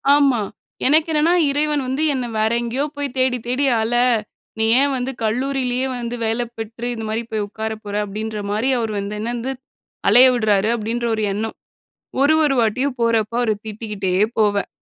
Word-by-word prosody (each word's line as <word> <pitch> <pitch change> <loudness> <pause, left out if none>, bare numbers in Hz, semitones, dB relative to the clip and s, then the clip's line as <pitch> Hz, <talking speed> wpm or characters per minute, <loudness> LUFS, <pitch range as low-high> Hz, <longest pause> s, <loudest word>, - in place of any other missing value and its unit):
ஆமா. 275 -6 +3 0.5
எனக்கு 310 +3 +4
என்னன்னா 315 +3 +3 0.2
இறைவன் 295 0 0
வந்து 270 +4 -1
என்ன 255 -2 -2
வேற 220 +1 +2
எங்கேயோ 240 +4 -2
போய் 280 -2 -3
தேடி 255 -1 +2
தேடி 260 +3 +1 0.2
அல, 225 +2 -1 0.7
நீ 220 - +3 0.2
ஏன் 280 -1 +2
வந்து 255 +2 -2
கல்லூரியிலேயே 255 +2 0
வந்து 240 0 -4
வேல 225 +2 0 0.2
பெற்று 230 +2 -6
இந்த 225 - -6
மாரி 225 +2 -1
போய் 215 -2 -1
உட்கார 220 +1 -4
போற 205 0 -5
அப்டின்ற 215 +1 -5
மாரி 225 +6 0
அவர் 225 -2 -2
வந்து 200 +1 -4
என்ன 225 +2 -3
வந்து 245 +3 -3 0.6
அலைய 245 +5 +8
விடுறாரு 215 -3 +2
அப்டின்ற 235 +2 -3
ஒரு 215 - -2
எண்ணம். 220 +2 -3 0.7
ஒரு 290 +3 +5
ஒரு 275 -2 +2
வாட்டியும் 255 +5 0
போறப்போ 230 0 +1
அவர 235 -3 +1 0.2
திட்டிக்கிட்டே 210 -3 -4 0.3
போவேன். 205 -2 +2
235 Hz, 170 wpm, -20 LUFS, 220-265 Hz, 0.7 s, அலைய